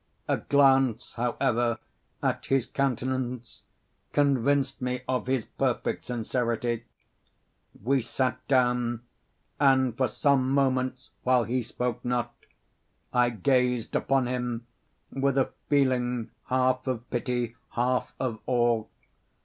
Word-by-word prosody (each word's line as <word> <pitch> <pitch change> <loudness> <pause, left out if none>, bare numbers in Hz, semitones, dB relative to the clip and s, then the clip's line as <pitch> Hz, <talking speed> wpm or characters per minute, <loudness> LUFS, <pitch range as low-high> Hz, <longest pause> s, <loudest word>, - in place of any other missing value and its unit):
A - - +2
glance, 135 -4 +3
however, 120 -1 0 0.5
at - - -1
his 135 -3 +2
countenance, 125 -2 -2 0.5
convinced 140 -1 +2
me 125 0 -2
of 125 -1 -1
his 130 -3 0
perfect - - -1
sincerity. 120 -1 -1 1.0
We 135 +3 +2
sat 130 +1 -1
down; 125 -3 +2 0.6
and 130 -4 +4
for 130 +1 +2
some 130 +3 +2
moments, 130 -1 0
while 125 -1 +3
he 125 +3 -1
spoke 125 +1 -3
not, 120 -1 -1 0.8
I 125 -1 +4
gazed 125 +2 +1
upon 135 -2 +2
him 125 -2 -3 0.5
with 135 0 0
a 135 - +2 0.2
feeling 125 -4 +1 0.2
half 130 0 +1
of 120 -2 -2
pity, 120 -1 -1 0.2
half 125 +1 0
of 120 -4 -2
awe. 120 -3 +2
125 Hz, 110 wpm, -27 LUFS, 120-130 Hz, 1.0 s, and